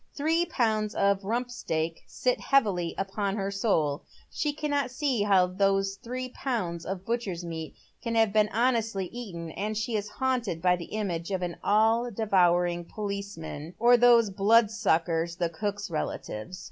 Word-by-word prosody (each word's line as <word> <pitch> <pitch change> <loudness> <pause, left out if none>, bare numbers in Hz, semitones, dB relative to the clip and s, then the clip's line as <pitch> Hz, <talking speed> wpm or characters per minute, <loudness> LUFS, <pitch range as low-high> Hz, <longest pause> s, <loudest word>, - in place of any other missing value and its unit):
Three 325 +4 +2
pounds 215 -7 0
of 200 0 +2
rump 240 +5 -2
steak 165 -8 -3
sit 250 -1 0
heavily 200 -11 +1
upon 195 +1 -2
her 200 -1 -2
soul. 165 -8 +1 0.3
She 300 - -1
cannot 285 -3 -1
see 255 -3 0
how 195 -3 +4
these 195 +1 +1
three 255 +3 -5
pounds 200 -11 -3
of 190 0 -4
butcher's 205 -7 -2
meat 160 -3 -6 0.3
can 230 -2 -2
have 225 -3 +3
been 210 -1 +4
honestly 225 -4 +1
eaten, 175 -9 -6
and 210 +5 -3
she 220 +1 -2
is 210 -1 -2
haunted 245 -10 -1
by 180 +1 +3
the 175 -1 -7
image 180 -5 -3
of 190 -2 -2
an 175 -2 -4
all 225 +3 +3
devouring 175 -5 +2
policeman 200 -6 -6
— - - -39
or 240 +2 +6
those 235 -3 +5
blood* 210 +3 +4
Buckers, 165 -2 +1
the 175 -2 0
cook's 205 +3 -4
relatives. 155 -1 -4
200 Hz, 160 wpm, -28 LUFS, 175-230 Hz, 0.3 s, or